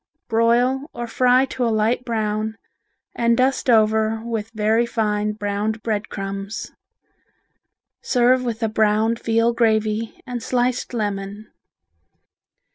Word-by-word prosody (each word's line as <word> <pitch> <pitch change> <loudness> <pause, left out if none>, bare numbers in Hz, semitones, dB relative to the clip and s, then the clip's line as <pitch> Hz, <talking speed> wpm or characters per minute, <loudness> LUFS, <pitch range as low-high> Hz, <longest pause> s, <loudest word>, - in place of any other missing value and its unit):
Broil 245 +5 +2
or 240 - -4
fry 250 +2 +3
to 260 -1 -4
a 235 - +2
light 225 +3 +1
brown 220 -2 -2 0.6
and 235 0 +2
dust 260 +1 +1
over 220 -1 +3
with 225 -2 -3
very 220 +1 +1
fine 210 -2 -1
browned 210 +1 -3
bread 215 -2 -2
crumbs. 195 +1 -5 1.3
Serve 250 0 +3
with 235 -1 -3
a - - +3
browned 220 +1 +1
veal 230 +1 +1
gravy 220 -1 0
and 245 -2 -5
sliced 245 0 -1
lemon. 205 -1 -4
225 Hz, 120 wpm, -21 LUFS, 215-240 Hz, 1.3 s, fry